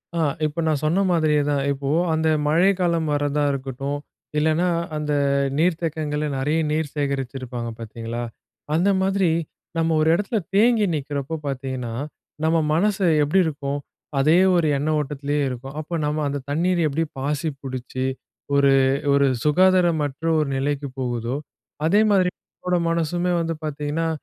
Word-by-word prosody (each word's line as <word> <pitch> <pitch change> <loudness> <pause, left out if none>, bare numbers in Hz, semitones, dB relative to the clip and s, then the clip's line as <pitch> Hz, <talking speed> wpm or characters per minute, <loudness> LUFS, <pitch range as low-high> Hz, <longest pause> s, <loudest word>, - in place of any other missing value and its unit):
ஆ - - 0 0.3
இப்ப 155 +2 -2
நான் 155 -2 +1
சொன்ன 170 +6 +2
மாதிரியே 155 -3 +3
தான். 140 -1 +1
இப்போ 140 0 -3 0.2
அந்த 160 0 +1 0.2
மழைக்காலம் 170 -1 +2
வரதா 145 0 0
இருக்கட்டும். 135 +1 -3 0.4
இல்லைனா, 160 +3 +2 0.3
அந்த 150 -1 -1 0.4
நீர்த்தேக்கங்கள்ல 155 -3 0
நிறைய 150 +4 +1
நீர் 155 -2 -1
சேகரிச்சிருப்பாங்க, 130 -4 -3
பார்த்தீங்களா. 115 +1 -5 0.5
அந்த 175 +5 +3
மாதிரி, 190 -1 +2 0.5
நம்ம 165 0 +2
ஒரு 155 - +3
இடத்தில 205 +5 0 0.2
தேங்கி 220 +1 +4
நிக்கிறப்போ 145 +1 -3
பார்த்திங்கன்னா, 130 -3 -4 0.5
நம்ம 160 +1 +3 0.2
மனசு 195 +3 +2 0.2
எப்டி 150 +7 +2
இருக்கும்? 145 -2 -3 0.4
அதே 155 +5 +5 0.2
ஒரு 170 -3 +3
எண்ண 145 +3 -1
ஓட்டத்திலயே 145 0 -2
இருக்கும். 135 +3 -7
அப்போ 155 +3 -7
நம்ம 150 +1 -1
அந்த 140 0 -2
தண்ணீரு 175 +4 +1
எப்டி 155 +4 0 0.2
பாசி 150 +3 -1
புடிச்சு, 130 -1 -4 0.5
ஒரு, 140 -1 +5 0.4
ஒரு 140 0 +4 0.2
சுகாதாரமற்ற 165 -3 +2
ஒரு 150 -2 0
நிலைக்கு 140 +1 -1
போகுதோ, 120 0 -2 0.5
அதே 200 +6 +4
மாதிரி 185 -3 +4 0.2
நம்மோட 180 -1 -2
மனசுமே 170 +2 0
வந்து 165 0 -1
பார்த்தீங்கன்னா, 150 +2 -2
150 Hz, 135 wpm, -23 LUFS, 140-165 Hz, 0.5 s, அதே